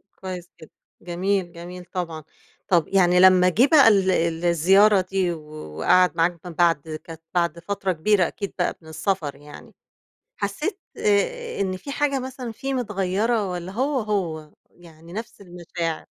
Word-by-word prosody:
كويس 180 -2 -7
جدًا، 160 - -13 0.3
جميل، 180 +1 -1
جميل 175 +1 -9
طبعًا. 170 -4 -5 0.4
طَب 170 -4 +3
يعني 180 -2 +3
لما 185 -1 +7
جِه 240 +10 +4
بقى 285 -7 +7
ال 195 -3 +4
ال 170 -1 0
الزيارة 190 +4 +5
دي 185 -1 -1
و 155 -2 -8 0.3
وقعَد 180 -1 +4
معاك 170 +1 +1
من 175 - -6
بعد 160 -2 +1
كانت 165 -1 -10
بعد 170 -1 0
فترة 195 +1 -2
كبيرة 180 +2 +2
أكيد 200 - -6
بقى 175 - 0
من 160 - -17
السفر 160 -3 -2
يعني، 145 +1 -14 0.6
حسّيت 300 - -3 0.2
آآ 470 - 0
إن 185 -1 -1
في 280 - -9
حاجة 285 -2 0
مثلًا 255 -2 -6
فيه 270 +3 -4
متغَيّرة 210 -1 0
والّا 180 +1 -5
هو، 265 +4 0
هو، 170 -8 -3 0.2
يعني 165 -1 -16
نفْس 220 0 -7
المشاعر. 175 -3 -5
185 Hz, 155 wpm, -23 LUFS, 170-205 Hz, 0.6 s, لما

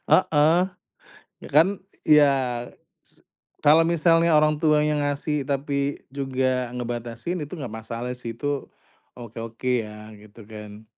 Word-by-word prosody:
heeh, 160 -1 +4 0.9
ya - - -8
kan 165 +5 +7 0.4
ya 150 -2 +6 0.7
se - - -20 0.4
kalau 155 +3 +7
misalnya 165 -1 +4
orang 150 0 +3
tuanya 150 -1 +3
ngasih 145 +1 -1
tapi 140 0 -1 0.2
juga 130 -2 -1
ngebatasin 120 +8 -4
itu 150 +2 -7
gak 130 -7 -6
masalah 115 +2 -5
sih 115 -2 -7
itu, 145 +1 -3 0.5
oke 120 -2 -10
oke 115 +3 -4
ya 105 0 -11
gitu 105 +2 -16
kan. 105 0 -10
140 Hz, 125 wpm, -24 LUFS, 115-150 Hz, 0.9 s, kan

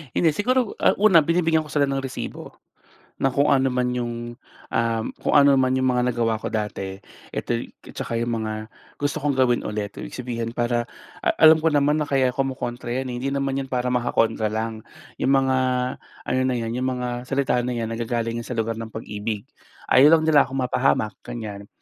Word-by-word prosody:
Hindi 165 - +4
siguro, 245 - 0
ah, - - +4
una 200 -5 +7
binibigyan 165 -1 +2
ko - - -12
sila 145 -2 +2
ng 135 0 -2
resibo, 130 - -7 0.6
na 135 - +3
kung 140 +3 +2
ano 135 -2 +3
man 125 0 0
yung, 120 -1 -4 0.4
ah, 115 -1 +1 0.2
kung - - +1
ano 140 -1 +6
naman 130 -1 +2
yung 130 - +1
mga 125 0 +1
nagawa 115 -2 0
ko - - -4
dati, 95 -3 -3 0.3
eto - - -2 0.4
tsaka 115 - -3
yung 115 -1 -1
mga 110 0 -4 0.3
gusto 145 +1 -2
kong 145 -2 +1
gawin 125 -2 +3
ulit, 105 -1 -4
ibig - - -7
sabihin, 120 -2 -4
para 120 0 -1 0.3
a - - +3
alam 160 0 +7
ko 160 - +3
naman 145 +1 +2
na 150 - -3
kaya 130 -3 +2
kumokontra 125 -3 -3
'yan 130 +2 -2
eh, - - -5
hindi 135 - -1
naman 135 -1 -1
'yan 135 - -7
para 125 -1 -1
makakontra 115 -3 +1
lang. 110 0 -3 0.4
Yung - - +2
mga 135 -1 +3 0.7
ano 130 +1 +1
na 130 -1 +1
'yan 115 0 -3
yung 130 +1 -1
mga 120 0 -3
salita 135 -3 +1
na 125 - -2
'yan, 115 -1 -3
nanggagaling 115 0 -2
sa 120 +1 -6
lugar 115 0 0
ng 115 0 -7
pag-ibig. 105 +1 -5 0.4
Ayaw 145 +5 +7
lang - - -3
nila 150 -3 +6
akong 135 - -6
mapahamak, 125 -4 +1
ganyan. 105 -3 -7
125 Hz, 195 wpm, -23 LUFS, 115-135 Hz, 0.7 s, una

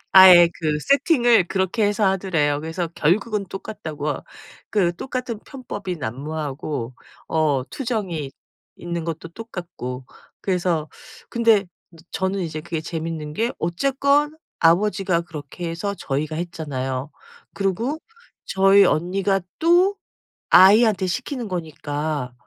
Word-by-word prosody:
아예 180 -2 +10
그 155 -2 0
세팅을 245 - +4
그렇게 190 +5 0
해서 205 +1 +1
하더래요. 175 -7 +1
그래서 165 +3 -3
결국은 200 +6 +1
똑같다고. 155 -7 -5 0.5
그 175 -5 +1
똑같은 250 0 -4
편법이 205 -9 -6
난무하고 140 0 -4 0.4
어 150 -5 +1
투정이 200 - -3 0.5
있는 170 -1 -4
것도 165 0 -5
똑같고 175 - -7 0.4
그래서 175 -5 0 0.4
근데 230 -4 +3 0.5
저는 190 +1 -1
이제 160 -3 -4
그게 165 -1 -4
재밌는 160 -2 -5
게 230 +8 0
어쨌건 280 - +1 0.2
아버지가 185 +1 +3
그렇게 165 0 -7
해서 200 +5 -3
저희가 150 +3 -2
했잖아요. 140 -5 -4 0.4
그리고 225 - -1 0.5
저희 195 +1 +5
언니가 195 +4 +1 0.2
또 350 +4 +4 0.6
아이한테 200 0 +6
시키는 250 +4 -3
거니까 150 -5 -3
175 Hz, 265 characters per minute, -22 LUFS, 155-210 Hz, 0.6 s, 아예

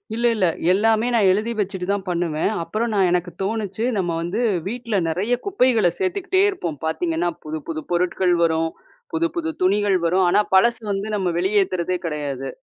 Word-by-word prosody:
இல்ல, 235 - -1
இல்ல. 190 -4 +2 0.3
எல்லாமே 220 +4 +3
நா - - +4
எழுதி 215 +4 0
வச்சுட்டு 190 -2 -2
தான் 200 -1 -2
பண்ணுவேன். 170 -1 0
அப்புறம் 220 +7 -2
நா 200 - +1
எனக்கு 180 0 0
தோணுச்சு, 215 0 -2
நம்ம 175 -3 0
வந்து 175 +7 -3 0.3
வீட்ல 230 -1 -3
நெறைய 195 +9 -1
குப்பைகள 255 - +3
சேத்துக்கிட்டே 380 0 +1
இருப்போம். 170 - -4
பாத்தீங்கன்னா, 165 +1 -1
புதுப்புது 155 +1 -5
பொருட்கள் 180 +1 +1
வரும், 160 0 +1 0.4
புதுப்புது 330 0 -1
துணிகள் 200 +1 +3
வரும். 185 +2 +3
ஆனா, 210 - +4
பழசு 235 +4 +4
வந்து 200 +2 -2
நம்ம 190 -3 0
வெளியேத்துறதே 185 -2 +1
கெடயாது. 140 -4 -3
190 Hz, 150 wpm, -22 LUFS, 175-225 Hz, 0.4 s, நா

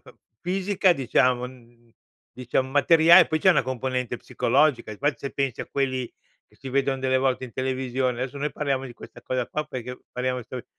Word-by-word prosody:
f - - -17 0.3
fisica, 190 0 +2
diciamo, 125 -1 +1
n 120 -2 -17 0.4
diciam 130 +1 -1
materiale 165 +5 +6
e - - -3
poi, 155 - -1
c'è 185 - +5
una 175 - +3
componente 125 -1 -3
psicologica, 125 -1 +1
e - - -6
infatti 145 +6 -1
se 140 - -5
pensi 135 -3 -2
a - - -5
quelli 130 -3 -1 0.4
che - - -26
si 135 - -8
vedon 135 0 0
delle 130 0 +2
volte 130 -1 0
in 120 - -11
televisione 130 -1 -2
adesso, 135 +2 -5
noi 150 +2 -2
parliamo 135 -3 -2
di 120 - -10
questa - - -13
cosa 125 -2 -2
qua 150 0 -3
perché 125 -2 -7
parliamo 125 0 -2
sol 125 -1 -7
130 Hz, 195 wpm, -25 LUFS, 125-140 Hz, 0.4 s, materiale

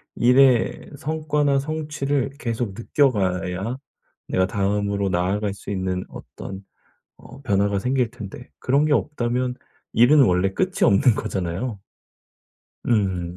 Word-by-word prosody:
일의 125 0 +3
성과나 150 -2 0
성취를 145 -2 -2
계속 115 -4 -3
느껴가야 100 -4 0 0.5
내가 95 - +2
다음으로 100 0 0
나아갈 95 +3 0
수 100 - -11
있는 95 -1 -2
어떤 95 0 -9 0.5
어 135 - -14
변화가 100 -3 +1
생길 125 +1 0
텐데 120 +1 -9
그런 140 +4 +2
게 150 - +2
없다면 125 -4 0 0.4
일은 135 +5 +6
원래 90 -3 +2
끝이 185 - -1
없는 120 +5 +5
거잖아요. 100 +2 -3 1.1
음 95 -6 0
115 Hz, 245 characters per minute, -23 LUFS, 95-135 Hz, 1.1 s, 일은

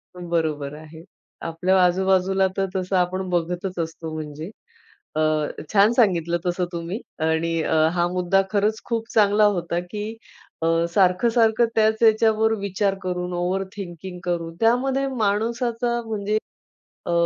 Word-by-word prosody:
पण 175 -1 -8
बरोबर 150 -4 -1
आहे. 160 +1 -12 0.4
आपल्या 180 +3 +2
आजूबाजूला 190 +1 +2
तर 195 - +2
तसं 185 0 -1
आपण 185 +1 0
बघतच 180 +1 -2
असतो 165 -1 -4
म्हणजे. 155 +2 -6 0.7
अ, - - 0 0.5
छान 205 +2 +5
सांगितलं 175 -8 +2
तसं 180 0 0
तुम्ही 170 +6 -4 0.3
आणि 160 +1 0 0.4
हा 175 -1 +1
मुद्दा 185 +1 +2
खरंच 210 +1 +1
खूप 230 -1 -2
चांगला 210 -1 +4
होता, 170 0 -2
की 210 +5 -6 0.4
अ, 165 - +1 0.2
सारखं-सारखं 220 +6 +3
त्याच 220 0 +2
याच्यावर 220 0 +4
विचार 200 0 0
करून 180 -1 -3
ओव्हर 180 +2 -1
थिंकिंग 180 -2 -7
करून 170 -2 -3
त्यामध्ये 260 +4 +2
माणसाचा 235 +1 -1
म्हणजे 215 -1 -1 0.7
अ, - - -2
190 Hz, 130 wpm, -23 LUFS, 175-215 Hz, 0.7 s, छान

